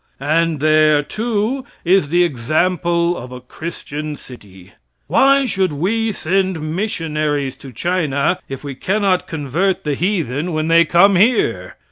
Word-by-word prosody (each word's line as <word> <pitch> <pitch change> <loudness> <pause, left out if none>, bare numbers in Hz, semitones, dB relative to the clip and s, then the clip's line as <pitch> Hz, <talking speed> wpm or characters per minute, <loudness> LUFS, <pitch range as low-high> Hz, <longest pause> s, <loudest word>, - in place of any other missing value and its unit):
And 155 +2 0
there, 155 -1 +4
too, 225 - -2 0.2
is 180 -4 +3
the 175 +3 +3
example 170 +4 0
of 125 -5 -8
a 125 - -8
Christian 150 +2 -7
city. 100 -9 -14 0.3
Why 275 - +4
should 190 -7 0
we 215 +9 -1
send 180 -4 -1
missionaries 155 -8 -2
to 135 - -11
China 160 - 0
if 135 0 -7
we 140 -1 -5
cannot 195 +4 0
convert 165 +5 -1
the 150 - -1
heathen 165 - -1
when 155 +1 -1
they 165 0 +5
come 185 +4 +4
here? 175 - +1
165 Hz, 135 wpm, -18 LUFS, 145-190 Hz, 0.3 s, they